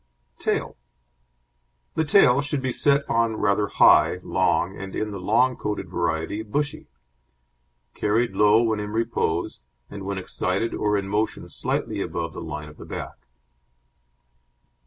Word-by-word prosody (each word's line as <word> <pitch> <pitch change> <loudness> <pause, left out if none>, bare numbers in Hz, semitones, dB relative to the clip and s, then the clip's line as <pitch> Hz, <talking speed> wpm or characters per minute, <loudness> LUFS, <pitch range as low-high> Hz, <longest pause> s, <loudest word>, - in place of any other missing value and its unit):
TAIL - - -1 1.2
The 160 - +1
tail 145 -5 +5
should 145 -1 -3
be 130 - 0
set 140 +2 +2
on 115 -1 +1
rather 100 0 +1
high, - - +5
long, 95 +3 +1
and 95 0 -7
in 110 0 -2
the 100 - -6
long 120 +7 +2
coated 105 -2 -4
variety 80 +6 -2
bushy; 140 +7 -3 1.1
carried 110 +3 +1
low 105 +3 +5
when 110 -2 0
in 105 0 -5
repose, 110 -7 -1 0.3
and 100 - -7
when 100 0 -3
excited 95 +4 -2
or 105 -1 +1
in 100 -1 -3
motion 105 +2 -1
slightly - - -2
above 85 -1 -3
the - - -7
line 75 -1 -6
of 75 - -14
the - - -10
back. - - -8
105 Hz, 140 wpm, -24 LUFS, 95-120 Hz, 1.2 s, tail